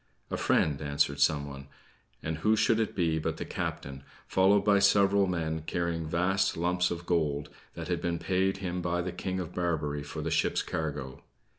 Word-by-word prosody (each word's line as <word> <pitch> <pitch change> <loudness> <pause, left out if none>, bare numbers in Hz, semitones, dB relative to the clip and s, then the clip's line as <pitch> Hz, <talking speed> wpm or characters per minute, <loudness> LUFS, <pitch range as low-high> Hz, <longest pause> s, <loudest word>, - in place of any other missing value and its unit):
"A - - 0
friend," 75 -2 +2
answered 70 -1 0
someone; 70 -2 0 0.6
and 80 0 -3
who 110 +6 +3
should 110 +1 +3
it 110 - -1
be 80 -4 +1
but - - -2
the - - -4
captain, 70 0 -4 0.2
followed 95 +2 +4
by 100 -1 +5
several 100 0 +4
men 80 -3 -2
carrying 85 -2 -1
vast 95 +3 +1
lumps 90 +1 +1
of 85 0 -5
gold, 75 -4 0 0.3
that - - -6
had 90 -1 -1
been 85 -1 -1
paid 95 +2 0
him 90 -2 -3
by 85 0 -1
the 90 - -3
King 95 +1 -3
of 90 -1 -5
Barbary 75 -5 -1
for 70 - -6
the - - -2
ship's - - +1
cargo. 70 -5 -4
85 Hz, 180 wpm, -29 LUFS, 75-95 Hz, 0.6 s, by